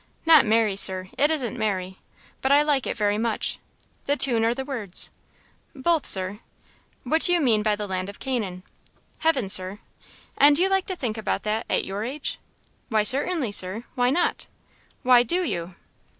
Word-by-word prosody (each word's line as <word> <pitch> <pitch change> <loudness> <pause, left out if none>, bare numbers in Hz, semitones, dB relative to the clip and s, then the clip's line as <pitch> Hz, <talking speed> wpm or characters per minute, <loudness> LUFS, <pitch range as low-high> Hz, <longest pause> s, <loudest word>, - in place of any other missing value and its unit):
"Not 315 -7 +6
merry, 220 -2 +2
Sir 185 -1 +2
it 290 +3 +2
isn't 260 -6 -3
merry; 190 -3 -3 0.4
but 265 - 0
I 290 +1 +5
like 290 -3 0
it - - -4
very 205 -1 0
much." 225 -1 -2 0.5
"The 285 +1 +1
tune 235 -6 +5
or 230 +1 +1
the 265 0 -5
words?" 225 -10 -2 0.6
"Both, 315 +3 0
Sir." 190 +2 +1 0.6
"What 315 +6 0
do 355 - +3
you 350 - +3
mean 235 -8 +2
by 210 -1 +1
the 210 0 -5
land 185 0 -4
of 200 - -11
Canaan?" 210 -9 -4 0.6
"Heaven, 285 -10 +1
Sir." 190 +1 +1 0.6
"And 290 +1 +6
do 340 - +4
you 385 - +2
like 385 -1 0
to 375 - -3
think 235 -9 -4
about 220 - -3
that, 215 +2 -2
at - - 0
your 200 +2 -5
age?" 270 +5 -4 0.5
"Why, 215 -3 +2
certainly, 275 - +1
Sir! 195 +3 -1
Why 245 0 +1
not?" 340 +7 -1 0.6
"Why 250 -1 +6
do 350 +10 0
you?" 175 - -4
235 Hz, 180 wpm, -24 LUFS, 205-285 Hz, 0.6 s, Not